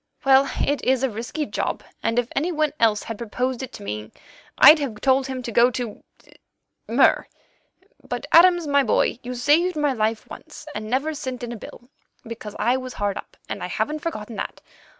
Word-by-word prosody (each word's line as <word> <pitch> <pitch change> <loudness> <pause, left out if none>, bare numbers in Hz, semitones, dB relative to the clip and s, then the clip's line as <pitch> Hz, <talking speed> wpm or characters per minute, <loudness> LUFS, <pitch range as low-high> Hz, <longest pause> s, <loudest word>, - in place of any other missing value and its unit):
Well, 270 0 +5 0.2
it 285 -2 -1
is 260 0 +2
a 265 - +1
risky 240 +8 -4
job, - - -3 0.2
and 230 - -1
if 245 -1 +2
any 325 +6 0
one 305 -3 0
else 220 -2 +3
had 225 -2 -7
proposed 250 +2 -2
it 260 - -6
to - - -9
me, 105 +1 -5 0.5
I'd 310 - +9
have 245 -7 -4
told 265 +2 +2
him 260 -1 -5
to 240 - -5
go 235 +2 +5
to—Mur. 240 -3 -2 0.8
But, - - -3
Adams, 350 0 +6
my 280 -1 +3
boy, 240 -1 +1
you 250 +1 -6
saved 305 +9 +2
my 295 -2 +1
life 220 -1 -1
once, - - -11
and 215 +1 -5
never 275 +6 0
sent 260 -4 -5
in 240 - -4
a - - -5
bill, 240 +2 -12 0.4
because 225 -2 -8
I 245 +3 +2
was 255 -1 -7
hard 205 -1 -2
up, - - -9
and - - -5
I - - -3
haven't 305 +1 -2
forgotten 235 -9 -5
that. - - -5
255 Hz, 190 wpm, -23 LUFS, 230-285 Hz, 0.8 s, I'd